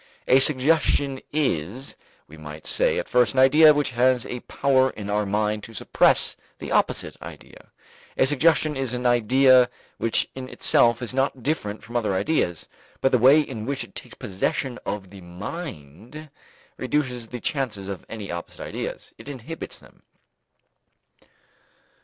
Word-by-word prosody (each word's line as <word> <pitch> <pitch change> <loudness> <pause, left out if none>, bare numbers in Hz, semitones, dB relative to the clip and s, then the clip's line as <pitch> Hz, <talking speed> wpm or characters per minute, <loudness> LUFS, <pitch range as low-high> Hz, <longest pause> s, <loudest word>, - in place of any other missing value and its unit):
A 130 - +6
suggestion 140 -1 +3
is, 130 - -2 0.3
we 75 - -13
might 75 0 -10
say - - +1
at - - -3
first, 125 -4 +2
an - - +2
idea 150 +4 +7
which 145 -3 0
has 125 0 +2
a 125 - -5
power 130 +1 +1
in 105 -4 -7
our 105 0 0
mind 105 +1 -1
to 115 - -12
suppress - - +2 0.2
the - - -8
opposite - - 0
idea. - - -12 0.5
A - - +4
suggestion 150 +2 +2
is 130 -2 -3
an 125 0 -5
idea 125 +2 +5 0.3
which 115 - +1
in 130 -1 -8
itself 120 -1 +3
is 120 - -2
not 135 -1 -1
different 110 -8 -3
from 120 - -12
other 105 -5 0
ideas, 95 - -1 0.3
but 135 - +2
the 125 - +3
way 135 +6 +6
in 115 -6 -6
which 140 -1 -2
it - - -14
takes - - -8
possession 120 +6 -3
of 100 -3 -5
the 100 -2 -12
mind 105 - -9 0.5
reduces 125 -3 -2
the 125 +2 -7
chances 120 -9 -3
of 100 -1 -6
any 105 -4 -7
opposite 85 0 -7
ideas; - - -6
it - - -10
inhibits 145 +4 -7
them. - - -20
125 Hz, 155 wpm, -24 LUFS, 105-135 Hz, 0.5 s, idea